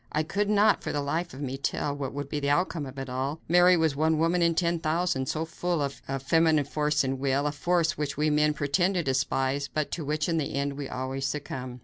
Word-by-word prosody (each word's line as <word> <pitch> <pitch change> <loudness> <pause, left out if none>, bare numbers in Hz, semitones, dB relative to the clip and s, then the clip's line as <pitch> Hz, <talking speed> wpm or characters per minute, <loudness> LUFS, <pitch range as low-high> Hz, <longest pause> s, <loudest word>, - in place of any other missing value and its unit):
I 155 - +1
could 205 +6 -1
not 210 0 +4
for - - -2
the 145 - -1
life 155 +5 -2
of 135 - -9
me 135 0 -3
tell 140 +1 -1
what 140 -2 -4
would 145 0 -5
be 145 +1 -3
the 140 0 -1
outcome 155 -1 0
of 130 +1 -10
it 135 0 -5
all. 135 +4 -3
Mary 180 +1 +6
was 160 -3 +1
one 160 +2 +2
woman 165 +3 +2
in 170 -1 +3
ten 170 0 +1
thousand, 155 -4 0
so 160 +1 -1
full 175 +1 -2
was 140 -2 -1
she - - -17
of 135 -1 -3
feminine 160 0 +3
force 150 0 0
and 135 0 -2
will 140 +1 +1
a 150 - +1
force 165 +1 0
which 145 -2 -2
we 150 +1 +2
men 150 0 +2
pretend 175 +7 +1
to 175 - +1
despise, 135 0 0
but 155 -1 -2
to 165 - -3
which 150 +1 -1
in 165 -2 0
the 140 - -3
end 140 0 -1
we 140 -1 -6
always 135 +1 -3
succumb. 130 -2 -5
150 Hz, 255 wpm, -27 LUFS, 140-165 Hz, -, Mary